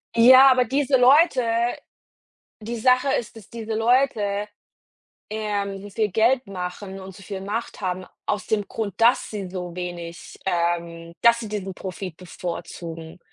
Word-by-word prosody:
Ja, 260 Hz, +3 st, +8 dB
aber 250 Hz, -1 st, +3 dB
diese 270 Hz, +2 st, +2 dB
Leute 270 Hz, +2 st, +5 dB, 1.2 s
die 230 Hz, +2 st, -5 dB
Sache 255 Hz, +3 st, +3 dB
ist, 230 Hz, -, -4 dB
dass 215 Hz, -3 st, -13 dB
diese 225 Hz, -1 st, -5 dB
Leute, 220 Hz, -3 st, +1 dB, 0.8 s
ähm, 205 Hz, -2 st, -3 dB
so 205 Hz, -, -9 dB
viel 210 Hz, 0 st, -1 dB
Geld 240 Hz, +4 st, +2 dB
machen 190 Hz, +1 st, -6 dB
und 190 Hz, -1 st, -10 dB
so 195 Hz, -, -13 dB
viel 195 Hz, 0 st, -6 dB
Macht 210 Hz, +4 st, -4 dB
haben 185 Hz, -1 st, -3 dB, 0.2 s
aus 205 Hz, -2 st, -2 dB
dem 205 Hz, -2 st, -1 dB
Grund, 205 Hz, -4 st, -4 dB
dass 235 Hz, +2 st, +4 dB
sie 200 Hz, -4 st, -5 dB
so 180 Hz, -2 st, -6 dB
wenig, 175 Hz, -1 st, -7 dB
ähm 170 Hz, -2 st, -2 dB
dass 235 Hz, 0 st, +5 dB
sie 220 Hz, -, -6 dB
diesen 195 Hz, -2 st, -4 dB
Profit 185 Hz, -2 st, -7 dB
bevorzugen. 170 Hz, -1 st, -7 dB
205 Hz, 150 wpm, -23 LUFS, 180-235 Hz, 1.2 s, Ja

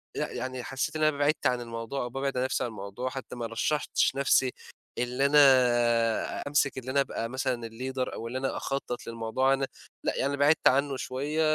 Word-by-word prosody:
لأ، -, -, -2 dB
يعني 130 Hz, -1 st, -4 dB
حسّيت 135 Hz, +5 st, -3 dB
إن 155 Hz, -, 0 dB
أنا 155 Hz, -2 st, +3 dB
بعِدت 145 Hz, +2 st, +2 dB
عن 125 Hz, -1 st, 0 dB
الموضوع 115 Hz, +3 st, -4 dB
أو 120 Hz, -, -4 dB
بابعد 135 Hz, +1 st, -2 dB
عن 125 Hz, -, +1 dB
نفسي 130 Hz, -, 0 dB
عن -, -, -2 dB
الموضوع، 105 Hz, +4 st, -5 dB
حتّى 130 Hz, -1 st, -7 dB
ما 120 Hz, -1 st, -4 dB
رشّحتش 130 Hz, +4 st, 0 dB
نَفْسي 135 Hz, -1 st, +3 dB, 0.5 s
اللي 125 Hz, +3 st, 0 dB
أنا 120 Hz, -5 st, +4 dB
أمسِك 145 Hz, -2 st, +1 dB
اللي 130 Hz, 0 st, -4 dB
أنا 140 Hz, +1 st, +3 dB
أبقى 115 Hz, -4 st, -3 dB
مثلًا 125 Hz, -2 st, -2 dB
الleader 130 Hz, +3 st, -4 dB
أو 115 Hz, -, -5 dB
اللي 125 Hz, +2 st, -4 dB
أنا 135 Hz, 0 st, -2 dB
أخطّط 135 Hz, -3 st, -4 dB
للموضوع 115 Hz, +4 st, +1 dB
أنا 135 Hz, 0 st, 0 dB, 0.4 s
لأ -, -, 0 dB
يعني 140 Hz, +1 st, 0 dB
بعِدت 145 Hz, +2 st, +4 dB
عنّه 140 Hz, +1 st, +2 dB
شوية 145 Hz, +5 st, -2 dB
130 Hz, 190 wpm, -28 LUFS, 120-140 Hz, 0.5 s, أنا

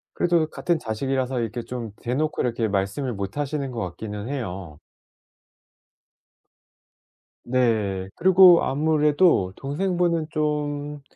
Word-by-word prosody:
그래도 170 Hz, -2 st, +2 dB
같은 170 Hz, 0 st, -1 dB
자식이라서 130 Hz, +2 st, -2 dB
이렇게 115 Hz, +1 st, -3 dB
좀 120 Hz, -3 st, -6 dB
대 120 Hz, +1 st, -2 dB
놓고 155 Hz, +2 st, -1 dB
이렇게 115 Hz, -2 st, 0 dB
말씀을 105 Hz, +6 st, -2 dB
못 100 Hz, +3 st, -5 dB
하시는 145 Hz, -1 st, -2 dB
것 120 Hz, -, -5 dB
같기는 105 Hz, +3 st, -6 dB
해요. 95 Hz, -, -5 dB, 2.7 s
네. 110 Hz, -7 st, 0 dB
그리고 185 Hz, -1 st, +7 dB
아무래도 150 Hz, -, +2 dB
동생분은 170 Hz, +2 st, -1 dB
좀 150 Hz, -1 st, -2 dB
135 Hz, 250 characters per minute, -24 LUFS, 110-155 Hz, 2.7 s, 그리고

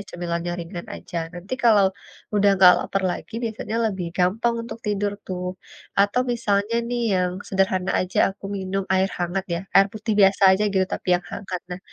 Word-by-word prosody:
cemilannya 175 Hz, 0 st, -3 dB
ringan 170 Hz, +1 st, -7 dB
aja. -, -, -9 dB, 0.2 s
Nanti 175 Hz, +6 st, -9 dB
kalau 210 Hz, -4 st, +6 dB, 0.5 s
udah 205 Hz, 0 st, +4 dB
enggak 180 Hz, -1 st, +9 dB
laper 195 Hz, -, -2 dB
lagi, 220 Hz, -, -7 dB
biasanya 225 Hz, 0 st, -4 dB
lebih 190 Hz, -3 st, -4 dB
gampang 215 Hz, +6 st, +1 dB
untuk 230 Hz, -, -7 dB
tidur 205 Hz, -1 st, 0 dB
tuh. 180 Hz, -1 st, -4 dB, 0.6 s
Atau 205 Hz, +5 st, +3 dB
misalnya 210 Hz, -2 st, 0 dB
nih 245 Hz, 0 st, -1 dB
yang 180 Hz, -1 st, +1 dB, 0.2 s
sederhana 190 Hz, -1 st, +1 dB
aja 185 Hz, -, -3 dB, 0.2 s
aku 200 Hz, -, -19 dB
minum 195 Hz, +1 st, -2 dB
air 190 Hz, 0 st, +3 dB
hangat 175 Hz, +2 st, -2 dB
ya, 170 Hz, -, -2 dB
air 195 Hz, 0 st, +7 dB
putih 215 Hz, 0 st, -2 dB
biasa 195 Hz, 0 st, +4 dB
aja 190 Hz, +2 st, +3 dB
gitu, 190 Hz, -1 st, +3 dB
tapi -, -, -8 dB
yang 175 Hz, -, 0 dB
hangat. 185 Hz, -2 st, -5 dB
Nah, 180 Hz, -, -4 dB
195 Hz, 175 wpm, -23 LUFS, 180-205 Hz, 0.6 s, enggak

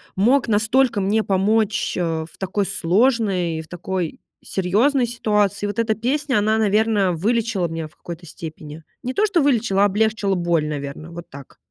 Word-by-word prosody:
мог 240 Hz, +7 st, +3 dB
настолько 220 Hz, +2 st, +2 dB
мне 215 Hz, +3 st, +1 dB
помочь, 210 Hz, +2 st, +1 dB
э, 180 Hz, -, 0 dB, 0.2 s
в 165 Hz, -, -18 dB
такой 195 Hz, +1 st, -1 dB
сложной 190 Hz, -3 st, +1 dB
и -, -, -3 dB
в 155 Hz, -, -14 dB
такой 175 Hz, -1 st, -4 dB, 0.2 s
серьёзной 235 Hz, +9 st, +1 dB
ситуации. 210 Hz, -3 st, 0 dB
Вот 205 Hz, -, -5 dB
эта 220 Hz, -1 st, +2 dB
песня, 260 Hz, +2 st, 0 dB
она, 215 Hz, +1 st, +2 dB
наверно, 210 Hz, -3 st, +2 dB
вылечила 215 Hz, 0 st, 0 dB
меня 165 Hz, -1 st, -5 dB
в -, -, -24 dB
какой-то 170 Hz, 0 st, -9 dB
степени. 155 Hz, -1 st, -9 dB, 0.2 s
Не 255 Hz, +1 st, -3 dB
то, 425 Hz, -, +2 dB
что 350 Hz, -6 st, +2 dB
вылечила, 235 Hz, -8 st, +2 dB
а -, -, +6 dB
облегчила 210 Hz, -1 st, +1 dB
боль, 170 Hz, -3 st, +1 dB
наверно, 150 Hz, +2 st, -6 dB
вот 170 Hz, 0 st, -9 dB
так. 140 Hz, 0 st, -12 dB
205 Hz, 170 wpm, -21 LUFS, 175-225 Hz, 0.2 s, а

